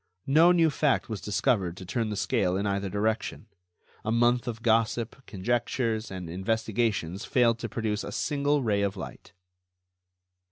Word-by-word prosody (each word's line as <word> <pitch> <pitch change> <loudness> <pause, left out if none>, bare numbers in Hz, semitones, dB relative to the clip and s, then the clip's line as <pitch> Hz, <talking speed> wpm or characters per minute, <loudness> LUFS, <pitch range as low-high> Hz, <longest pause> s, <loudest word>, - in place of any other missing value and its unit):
No 160 +6 +6
new 165 -3 +4
fact 145 -3 +1
was 110 -4 -4
discovered 100 -3 0
to 95 - -8
turn 115 +4 -1
the 105 - -3
scale 95 -2 +1
in 100 - -1
either 100 -1 -1
direction. 110 +2 -1 0.6
A 110 - -1
month 120 +1 +2
of 115 -1 -5
gossip, 115 +2 +1
conjectures 115 +2 -1
and 95 -2 -6
investigations 105 0 -1
failed 120 -4 +2
to 115 - -4
produce 110 -1 -2
a - - -6
single 145 -1 0
ray 105 -3 +1
of 100 0 -1
light. - - -9
110 Hz, 155 wpm, -28 LUFS, 100-120 Hz, 0.6 s, No